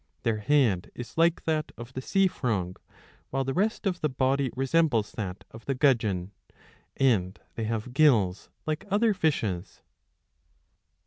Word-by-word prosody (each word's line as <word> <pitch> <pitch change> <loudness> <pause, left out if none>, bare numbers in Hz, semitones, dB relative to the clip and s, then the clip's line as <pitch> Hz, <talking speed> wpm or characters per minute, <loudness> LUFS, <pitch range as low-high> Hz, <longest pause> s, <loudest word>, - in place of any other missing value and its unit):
Their 115 -2 +1
head 110 -6 +2
is 120 -2 -8
like 165 +1 +3
that 155 -1 -1
of 120 +2 -9
the 130 - -4
sea 195 +8 +2
frog, 105 - -1 0.5
while 135 0 -1
the 135 0 -2
rest 215 +6 0
of 180 -2 -1
the 150 - +1
body 130 +1 +1
re 135 +1 -1
sembles 140 -8 +2
that 95 -3 -5
of 115 0 -12
the 135 - -1
gudgeon, 110 -9 +2 0.7
and 105 -8 +2
they 115 - -3
have 115 +2 -3
gills 115 -11 +3 0.2
like 155 0 -2
other 210 +2 +3
fishes. 110 - -1
130 Hz, 150 wpm, -27 LUFS, 110-155 Hz, 0.7 s, like